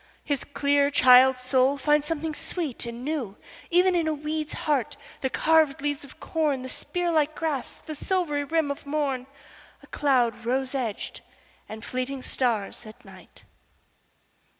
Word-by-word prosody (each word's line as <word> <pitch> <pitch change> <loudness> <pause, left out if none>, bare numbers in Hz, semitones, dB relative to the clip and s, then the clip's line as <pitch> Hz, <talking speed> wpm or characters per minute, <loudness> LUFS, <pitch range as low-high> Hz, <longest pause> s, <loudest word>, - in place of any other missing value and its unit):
His 285 -3 -2
clear 285 0 +2
child's 255 -1 +6
soul 260 +2 +2
finds 295 +1 +2
something 320 0 -2
sweet 295 -6 -3
and 235 +3 -6
newEven 315 - 0
in 335 -2 +1
a 310 - 0
weed's 305 +1 -3
heart, 285 -7 0 0.2
the 265 - -1
carved 315 -1 +3
leaves 290 0 -2
of 280 - -14
corn, 300 -5 -1
The 260 - -6
spear 350 +5 -2
like 310 -1 +1
grass, 300 -6 -3
the 310 - -8
silvery 305 -2 -1
rim 315 0 0
of 280 - -7
morn,A 275 -2 -5
cloud 250 -6 +1
rose 255 +3 -1
edged, 240 -6 -3 0.5
and 220 0 -8
fleeting 255 +1 -3
stars 230 -3 -1
at 215 - -14
night! - - -15
280 Hz, 145 wpm, -26 LUFS, 255-310 Hz, 0.5 s, child's